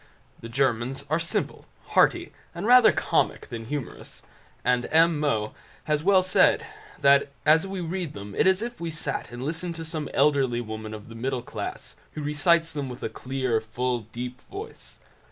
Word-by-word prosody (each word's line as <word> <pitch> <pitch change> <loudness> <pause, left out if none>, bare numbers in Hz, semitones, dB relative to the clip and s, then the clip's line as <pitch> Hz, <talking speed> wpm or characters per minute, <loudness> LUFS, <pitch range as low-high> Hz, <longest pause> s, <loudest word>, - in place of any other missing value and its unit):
The 115 - -9
Germans 130 +2 0
are 155 - +3
simple, 165 +1 -2 0.2
hearty, - - +3 0.2
and 175 +4 -4
rather 250 0 +8
comic - - 0
than 115 -1 -6
humorous; 140 +1 -6 0.4
and 125 0 +2
M. 165 -1 +4
Moe 110 -8 0 0.3
has 150 0 0
well 190 0 +5
said, 185 - +4 0.4
that 140 0 +5 0.2
as 160 +4 +5
we 190 -1 -4
read 175 -1 -3
them 100 0 -8
it - - +2
is 190 +3 +3
as 240 - -3
if 240 - -20
we 170 - -2
sat 160 -5 -3
and 120 +1 -6
listened 165 +4 -3
to 165 0 -6
some 155 -2 -4
elderly 135 -4 +2
woman 110 -1 -6
of 105 -1 -11
the 115 - -10
middle 125 +2 -3
class, - - -6 0.2
who 155 - -5
recites 165 +3 +2
them 145 -3 -3
with 125 - -8
a - - -1
clear, 130 -1 -1
full, 120 +3 -2
deep 125 +2 -6
voice. 410 +3 -9
140 Hz, 180 wpm, -26 LUFS, 120-165 Hz, 0.4 s, rather